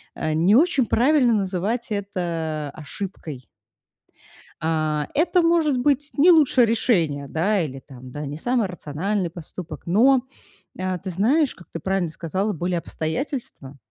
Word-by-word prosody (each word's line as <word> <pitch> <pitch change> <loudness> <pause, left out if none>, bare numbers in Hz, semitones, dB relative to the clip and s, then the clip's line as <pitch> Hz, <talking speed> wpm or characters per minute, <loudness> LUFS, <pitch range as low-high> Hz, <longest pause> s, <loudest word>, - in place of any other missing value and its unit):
а 155 0 -2
не 175 +7 +4
очень 285 -3 +4
правильно 255 -1 +3
называть 200 +4 -1
это 165 -7 -3
ошибкой. 155 - -7 1.2
А, 155 -2 0
это 355 +4 +3
может 330 -5 +3
быть 285 +2 +1
не 345 +6 +7
лучшее 285 -6 +5
решение, 170 - +1
да, 190 +6 +1
или 135 -4 -4
там, 130 -2 -12
да, 150 +2 -5
не 145 +2 -5
самый 240 +1 0
рациональный 180 +3 -3
поступок, 170 +1 -9
но, 245 +9 +4 0.6
э, 185 0 -2
ты 190 - -6
знаешь, 250 - +2
как 180 - -16
ты 165 - -5
правильно 190 -1 -1
сказала, 190 +6 -2
были 175 +1 -2
обстоятельства, 160 - -4
185 Hz, 140 wpm, -23 LUFS, 160-245 Hz, 1.2 s, не